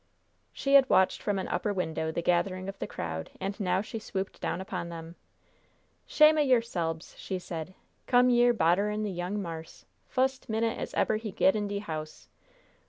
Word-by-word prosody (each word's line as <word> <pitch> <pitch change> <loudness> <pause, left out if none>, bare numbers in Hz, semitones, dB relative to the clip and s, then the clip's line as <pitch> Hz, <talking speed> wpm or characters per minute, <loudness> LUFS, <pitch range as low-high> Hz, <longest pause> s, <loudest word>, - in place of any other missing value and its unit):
She 275 - -1
had 275 -1 +7
watched 190 - +3
from 205 -2 0
an 190 - -3
upper 210 - -1
window 160 -4 -2
the 170 - -3
gathering 185 +2 +1
of 195 - -7
the - - -3
crowd, 80 0 -5
and 195 +2 -4
now 185 -1 +1
she 220 +1 -6
swooped 195 -2 -5
down - - -2
upon 185 -2 -4
them. 165 0 -8 0.9
"Shame 305 0 +6
o' - - +5
yerselbes!" 230 - 0
she 190 - -3
said. 175 0 -6 0.3
"Come 250 0 +5
yere 240 0 +5
bodderin' 210 +1 +2
the 210 - -2
young 180 +3 -3
marse 165 -4 -7 0.2
fust 265 0 0
minute 225 +1 0
as - - -5
eber 215 - +2
he 220 0 -5
get 190 - +3
in 210 -1 -1
de 200 0 -3
house! 155 -6 -6
195 Hz, 180 wpm, -29 LUFS, 175-225 Hz, 0.9 s, had